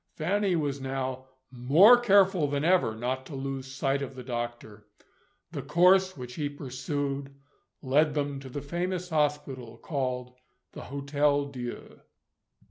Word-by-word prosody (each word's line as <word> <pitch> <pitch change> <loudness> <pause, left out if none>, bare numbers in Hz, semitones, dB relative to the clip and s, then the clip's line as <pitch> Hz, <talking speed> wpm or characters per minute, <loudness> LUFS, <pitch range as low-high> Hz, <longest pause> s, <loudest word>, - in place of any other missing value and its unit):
Fanny 195 +3 +1
was 145 -4 -2
now 130 -1 -3 0.3
more 145 - +7
careful 195 -8 +4
than 145 0 -1
ever 175 -11 +3
not 125 +3 -3
to 145 - -8
lose 135 0 -4
sight 135 +1 -1
of 135 -1 -5
the 130 - -8
doctor. 120 -4 -6 0.6
The - - -4
course 185 +2 +4
which 125 -1 -7
he 145 +1 -2
pursued 140 0 -4 0.5
led 145 +3 +2
them 145 -2 -2
to 135 -1 -10
the 140 +2 -6
famous 180 +4 -3
hospital 145 -6 -1
called 125 -3 -3 0.4
the - - -9
Hotel 140 +1 0
Dieu. 125 -4 -8
140 Hz, 135 wpm, -28 LUFS, 130-155 Hz, 0.6 s, more